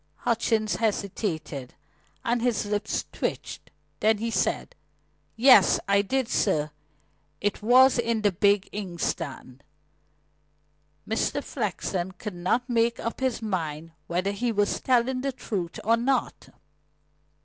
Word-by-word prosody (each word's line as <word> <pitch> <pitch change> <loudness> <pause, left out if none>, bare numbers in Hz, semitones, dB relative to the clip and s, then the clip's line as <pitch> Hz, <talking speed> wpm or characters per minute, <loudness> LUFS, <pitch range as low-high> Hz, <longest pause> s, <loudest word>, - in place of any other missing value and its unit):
Hutchings 225 -2 +1
hesitated, 190 - -3 0.5
and 235 0 +1
his 240 -3 0
lips 205 +1 -2
twitched. - - -4 0.3
Then 220 0 +3
he 230 +2 -3
said: - - -1 0.6
"Yes, 230 -4 +6
I 200 0 +4
did, 260 +4 -1
sir. 155 -10 +1 0.7
It 205 +1 -1
was 250 +3 +6
in 230 -2 0
the 205 - +4
big 200 +2 +2
inkstand." 170 -9 -4 1.4
Mr. 225 +6 -1
Flexen 190 -5 -3
could 210 +1 -7
not 185 +8 0
make 235 -1 +1
up 230 - -4
his 260 -3 -1
mind 165 -6 -3 0.2
whether 185 +3 0
he 235 +4 -1
was 205 -2 0
telling 255 0 +2
the 275 +1 -1
truth 185 -9 -4
or 230 +2 +3
not. 250 +1 -1
215 Hz, 120 wpm, -26 LUFS, 190-235 Hz, 1.4 s, Yes